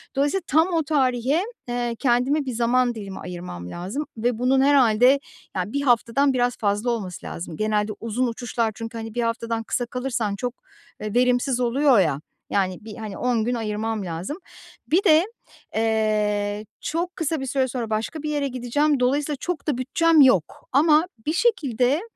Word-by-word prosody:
Dolayısıyla 290 +8 +1
tam 320 +4 +4
o 325 - +2
tarihe, 275 +2 +1 0.2
eee, 240 -1 -2
kendime 270 +3 +2
bir 255 - -3
zaman 240 +1 +2
dilimi 200 -3 -7
ayırmam 175 - -7
lazım 195 +13 -4
ve 235 0 0
bunun 265 +2 +3
herhâlde, 265 -1 +5 0.4
ya, 185 +4 -2
1 280 - 0
haftadan 260 +2 +3
biraz 245 -1 +1
fazla 210 +3 0
olması 200 -7 -4
lazım. 165 -2 -6
Genelde 215 0 0
uzun 230 +3 -1
uçuşlar 235 -1 -2
çünkü, 230 +1 -6
hani, 225 0 -7
1 240 - 0
haftadan 230 -1 -2
kısa 245 +2 -1
kalırsan 240 -4 -2
çok, 245 +4 -3 0.5
eee, 215 -1 -4
verimsiz 250 +1 +2
oluyor, 250 0 +4
ya, 150 -6 +1 0.3
yani, 185 -2 0
bir, 220 - -8
hani, 215 -4 -6
10 245 -3 +1
gün 245 - 0
ayırmam 220 -1 -2
lazım. 175 - -4 0.5
Bir 355 +5 +3
de, 320 -2 +5 0.5
eee, 215 -2 0 0.2
çok 345 +3 -2
kısa 320 -2 -1
bir 270 - -4
süre 265 0 +1
sonra 245 -3 -4
başka 225 +8 -3
bir 305 - -2
yere 290 -2 0
gideceğim. 265 +3 0
Dolayısıyla 280 +3 +1
çok 350 -4 -4
da 290 -5 +1
bütçem 315 +5 +3
yok. 225 - +3
Ama 305 +4 +4 0.2
bir 310 - 0
şekilde, 290 - +2
245 Hz, 170 wpm, -23 LUFS, 220-280 Hz, 0.5 s, herhâlde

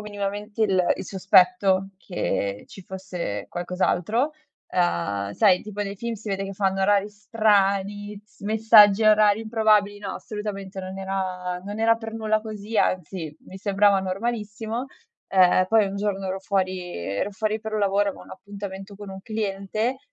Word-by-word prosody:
minimamente 205 +1 -4
il 190 -4 +3
il - - -6
sospetto 195 +1 +3
che 100 - -3
ci 195 - -12
fosse 180 - -5
qualcos'altro. 180 - 0 0.4
Uhm, 100 - 0
sai 180 - +4
tipo 210 -1 -7
nei 200 0 -4
film 235 +3 -4
si 220 0 -9
vede 195 0 -1
che 195 0 -6
fanno 195 -1 0
orari 205 +1 +3
strani, 205 -1 0 0.2
messaggi 215 0 +6
a 215 - +8
orari 210 0 +4
improbabili, 215 -2 +2
no 200 -2 -5
assolutamente, 200 -2 -6
non 190 +1 -7
era 185 -2 -3
non 205 +2 -6
era 230 0 +4
per 225 -1 -7
nulla 215 -1 0
così, 215 0 -6
anzi 170 -3 -1
mi 190 - -10
sembrava 200 0 +3
normalissimo. 220 +4 -3 0.4
Uhm, 185 -1 +5
poi 220 -2 +4
un 195 - -5
giorno 200 -1 -2
ero 190 +1 -3
fuori 190 -1 -1
ero 100 - -3
fuori 215 +1 -2
per 220 0 -5
un - - 0
lavoro, 200 0 +2
avevo 195 - -6
un - - -16
appuntamento 195 0 -8
con 205 -1 -9
un 190 0 -8
cliente 215 +3 -2
200 Hz, 160 wpm, -24 LUFS, 190-215 Hz, 0.4 s, a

